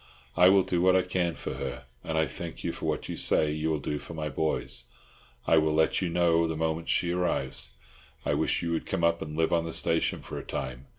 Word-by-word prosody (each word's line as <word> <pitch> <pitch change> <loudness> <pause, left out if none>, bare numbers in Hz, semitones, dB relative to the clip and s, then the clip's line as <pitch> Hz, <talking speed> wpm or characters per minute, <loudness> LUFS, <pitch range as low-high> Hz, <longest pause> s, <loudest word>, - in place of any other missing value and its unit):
I 90 +1 +7
will 95 0 +5
do 90 -1 0
what 95 0 +5
I 95 - +4
can 85 -3 -1
for - - -5
her, 65 0 -5 0.2
and 80 - -2
I 80 - +3
thank 80 +4 -7
you - - -1
for - - -5
what - - -2
you - - -4
say 75 -1 +2
you 75 +1 -1
will 80 - +1
do 75 +1 -3
for 80 - -9
my 75 -1 -3
boys. 65 -4 -1 0.6
I 80 - +5
will 75 0 +1
let 80 +4 +2
you 90 - 0
know 85 -1 +3
the 80 -1 -3
moment 80 +1 -1
she 85 - +2
arrives. 85 -7 -1 0.6
I - - +1
wish - - +1
you 85 - -1
would 80 - -2
come 95 -3 -2
up 85 0 +2
and 75 0 -5
live 80 +1 +2
on 85 -1 +3
the 85 - -4
station 80 0 +1
for - - -6
a - - -8
time. 65 0 -5
80 Hz, 245 wpm, -28 LUFS, 75-85 Hz, 0.6 s, I